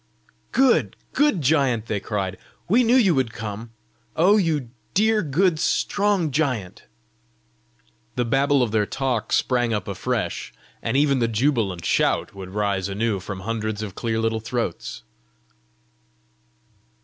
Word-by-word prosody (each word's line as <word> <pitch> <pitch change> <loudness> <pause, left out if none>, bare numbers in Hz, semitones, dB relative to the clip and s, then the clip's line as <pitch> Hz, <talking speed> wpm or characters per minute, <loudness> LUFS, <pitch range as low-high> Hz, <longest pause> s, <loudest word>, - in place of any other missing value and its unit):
"Good, 265 -2 +3 0.2
good 290 - +2
giant!" 130 -6 +2
they 110 -2 -2
cried. 95 -3 -3 0.3
"We 235 +7 +4
knew 235 +2 +4
you 210 -9 +5
would 130 -5 0
come! 110 0 -6 0.5
Oh 185 +6 +5
you 155 - 0 0.2
dear, 215 +2 +3
good, 165 +2 +1
strong 200 -3 +1
giant!" 125 - -2 1.3
The 125 - 0
babble 135 +2 +3
of 115 - -2
their 105 -2 +1
talk 125 -5 -2
sprang 120 -3 +1
up 105 - -4
afresh, - - -3 0.3
and 115 +4 0
ever 145 0 +4
the 120 -4 +1
jubilant 110 - 0
shout - - +1
would 95 -2 -8
rise 100 -1 -1
anew 105 0 -1
from 95 +1 -7
hundreds 110 0 -3
of 100 -3 -6
clear 115 +2 -2
little 115 0 0
throats. 115 - -4
120 Hz, 135 wpm, -23 LUFS, 105-155 Hz, 1.3 s, you